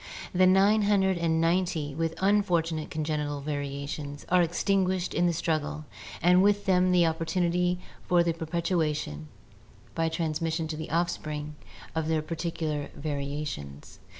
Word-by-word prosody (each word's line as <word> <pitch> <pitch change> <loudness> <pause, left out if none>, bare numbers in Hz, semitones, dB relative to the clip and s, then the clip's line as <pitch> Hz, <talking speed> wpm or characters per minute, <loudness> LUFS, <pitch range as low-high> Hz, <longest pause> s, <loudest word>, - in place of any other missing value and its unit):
The 185 0 +5
nine 200 +3 +5
hundred 190 -3 +2
and 165 -1 +1
ninety 165 -3 +1
with 165 +2 -2
un 205 +2 +5
fortunate 165 -5 -1
congenital 150 -3 -2
variations 145 0 -4
are 180 0 +5
extinguished 185 +1 +1
in 175 - +2
the - - +3
struggle 155 -2 -2 0.4
and 180 +1 +6
with 205 +1 +3
them 185 -1 +3
the 175 -1 +5
opportunity 175 +2 0 0.3
for 175 -1 +4
the 170 -1 +1
perpetuation 160 - -2 0.7
(by 165 0 0
trans 160 -1 -2
mission 165 0 -1
to 155 - -3
the 155 +1 -6
offspring) 155 -3 -2 0.4
of 160 -1 -1
their 160 -1 +1
particular 160 -2 -3
variations. 140 - -5
165 Hz, 140 wpm, -28 LUFS, 150-180 Hz, 0.7 s, and